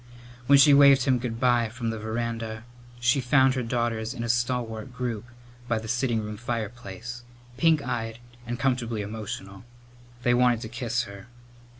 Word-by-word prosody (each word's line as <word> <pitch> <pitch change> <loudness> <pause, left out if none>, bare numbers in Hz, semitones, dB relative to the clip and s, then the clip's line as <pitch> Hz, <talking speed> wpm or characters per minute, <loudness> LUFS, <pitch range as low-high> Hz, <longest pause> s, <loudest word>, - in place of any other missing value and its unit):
When 140 - +7
she 145 +1 +7
waved 140 -2 +7
him 130 -2 +2
good 115 -2 -4
bye 120 -2 +3
from 115 0 -3
the 110 - -5
veranda 110 0 -4 0.4
she 120 +3 +2
found 130 +1 +4
her 130 - -1
daughters 115 -1 -2
in 115 - -4
a 115 - -3
stalwart 120 0 -1
group 120 -3 -4 0.4
by 115 -2 +1
the 110 0 -6
sitting 120 -1 0
room 105 0 -6
fireplace, 120 0 -5 0.4
pink 160 -3 +3
eyed 115 -2 -3 0.3
and 120 +1 -3
comfortably 120 -4 -1
emotional. 105 -1 -7 0.6
They 120 - +3
wanted 120 -2 +3
to 110 - -6
kiss 120 0 -1
her. 100 -1 -11
120 Hz, 165 wpm, -26 LUFS, 110-125 Hz, 0.6 s, When